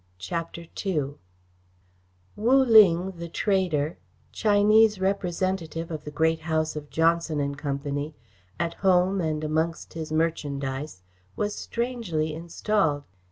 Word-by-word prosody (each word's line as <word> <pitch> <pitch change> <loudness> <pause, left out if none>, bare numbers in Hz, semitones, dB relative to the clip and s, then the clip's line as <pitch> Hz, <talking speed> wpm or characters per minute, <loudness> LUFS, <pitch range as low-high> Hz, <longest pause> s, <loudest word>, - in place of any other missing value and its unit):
CHAPTER 165 - -5 0.2
II 150 -8 -1 1.2
Wu 235 +5 +3
Ling, 190 -6 +6
the 170 0 -6
trader, 175 -6 0 0.3
Chinese 215 0 +4
representative 185 -3 -1
of 155 -2 -6
the - - -4
great 160 +2 +1
house 160 -1 -1
of 150 -1 -7
Johnson 165 -1 +1
and 140 0 -1
Company, 145 +1 -3 0.4
at 170 0 -1
home 185 +1 +2
and 155 -2 -1
amongst 160 +2 -1
his 160 -1 -6
merchandise, 145 - -2 0.3
was 210 0 -1
strangely 225 -13 -2
installed. 165 -1 0
165 Hz, 115 wpm, -26 LUFS, 150-190 Hz, 1.2 s, Ling